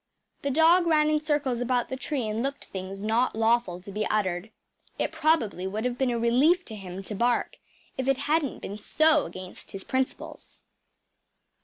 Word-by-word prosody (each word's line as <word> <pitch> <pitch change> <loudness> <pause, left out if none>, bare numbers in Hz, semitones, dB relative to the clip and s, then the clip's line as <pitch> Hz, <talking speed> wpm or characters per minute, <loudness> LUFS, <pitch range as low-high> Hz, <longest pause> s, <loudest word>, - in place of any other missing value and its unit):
The 280 - -1
dog 330 +5 +5
ran 305 -2 +4
in 305 -1 +2
circles 290 -5 0
about 245 -1 0
the 260 - -3
tree 265 -3 -3
and 215 +1 -2
looked 275 +2 -3
things 190 0 -6
not 220 +5 +1
lawful 225 -5 +2
to 200 - -10
be 210 +2 -2
uttered. 190 -1 -1 0.5
It - - -1
probably 235 - +1
would 215 +4 -3
have 245 -1 -2
been 265 -2 +2
a 240 - 0
relief 270 +10 +3
to 220 - -8
him 190 -1 -7
to 210 - -6
bark 240 +4 0 0.4
if 260 - -1
it 270 -1 +3
hadn’t 300 -2 0
been 205 +2 -6
so 310 +6 +3
against 185 0 -10
his 195 -1 -7
principles. 260 0 -4
240 Hz, 180 wpm, -27 LUFS, 210-290 Hz, 0.5 s, dog